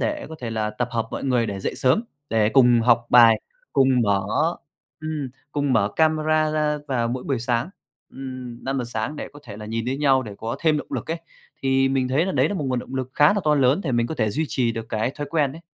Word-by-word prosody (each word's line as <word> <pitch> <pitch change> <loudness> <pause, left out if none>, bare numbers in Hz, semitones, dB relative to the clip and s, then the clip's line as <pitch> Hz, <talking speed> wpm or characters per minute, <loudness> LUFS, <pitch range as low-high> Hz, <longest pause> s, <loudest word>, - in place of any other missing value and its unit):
để 305 -1 -2
có 160 - -8
thể 120 - -4
là 110 -1 -1
tập 120 +3 -3
hợp 115 -1 -1
mọi - - -5
người 125 -3 +2
để 100 -2 -4
dậy - - -3
sớm, 130 - +2 0.3
để 110 -1 +3
cùng 120 -3 +5
học 120 0 +3
bài, 115 -2 +7 0.3
cùng 135 - +4
mở 100 -2 +2 0.8
ừm, 155 -3 -4 0.2
cùng 145 -2 0
mở 100 - +3
camera 155 0 +2
ra 150 -1 0
vào 120 -3 0
mỗi 125 +1 -3
buổi 135 -3 -1
sáng, 120 +6 -1 0.4
ừm, 130 -2 -8
5:00 135 -2 -1
sáng 120 +6 -4
để - - -5
có 145 - -13
thể 105 -4 -9
là 105 0 -8
nhìn 115 +1 -3
thấy 130 +2 -1
nhau 135 -3 +3
để 105 -4 -8
có 115 +1 -4
thêm 155 -2 +2
động - - -6
lực - - -4
ấy. 165 - -2 0.4
Thì 135 0 +3
mình 135 -1 0
thấy 145 +7 +1
là 190 - -1
đấy 135 +2 +2
là 205 - -3
một 155 - -2
nguồn 125 -1 0
động 130 - -7
lực 130 -1 -3
khá 150 +4 +5
là 205 - 0
to 150 -1 +4
lớn 135 +4 +3
để 135 - -1
mình 120 0 +2
có 160 - -4
thể 110 -7 0
duy 155 +8 -1
trì 120 -3 0
được 115 0 -5
cái 110 +3 0
thói 145 - -4
quen 150 -5 +1
ấy. 165 - -11
130 Hz, 255 wpm, -23 LUFS, 115-150 Hz, 0.8 s, bài